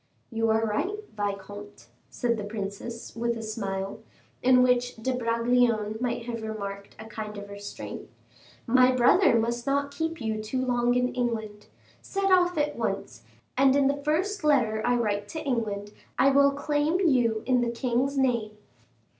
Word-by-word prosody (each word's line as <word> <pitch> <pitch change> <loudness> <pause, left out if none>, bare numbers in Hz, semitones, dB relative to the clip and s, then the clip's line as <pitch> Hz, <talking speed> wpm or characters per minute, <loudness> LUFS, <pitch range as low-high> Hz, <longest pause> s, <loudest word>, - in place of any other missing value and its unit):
"You 225 0 0
are 220 0 +2
right, 370 - -1 0.2
vicomte," 205 0 -5 0.2
said 240 -2 0
the 215 - -5
princess, 205 +2 -6
with 235 0 -1
a 225 - -6
smile, 195 -3 -4 0.4
in 250 0 +5
which 250 0 +2
De 245 +3 -2
Bragelonne 230 -2 +1
might 240 -2 -2
have 235 -2 -4
remarked 200 -2 -6
a 220 - -9
kind 215 -1 -7
of 205 0 -8
restraint; 200 0 -8 0.6
"my 255 +1 +5
brother 255 +4 +5
must 235 +2 -2
not 280 +1 +1
keep 325 +1 -3
you 220 -2 -2
too 255 +4 -2
long 245 -1 +2
in 250 0 +1
England; 220 -4 -3 0.3
set 390 -1 -1
off 360 -2 +4
at 295 0 0
once, - - -3 0.3
and 270 +1 +4
in 280 -1 +3
the 285 +1 -1
first 360 +6 0
letter 245 -8 +2
I 245 - +2
write 205 -3 -1
to 315 - -5
England, 210 -5 -2 0.2
I 275 - +5
will 280 +1 +5
claim 290 +4 0
you 245 - +2
in 250 -1 +3
the 240 - 0
king's 250 +3 -1
name." 235 -5 0
235 Hz, 165 wpm, -27 LUFS, 215-270 Hz, 0.6 s, in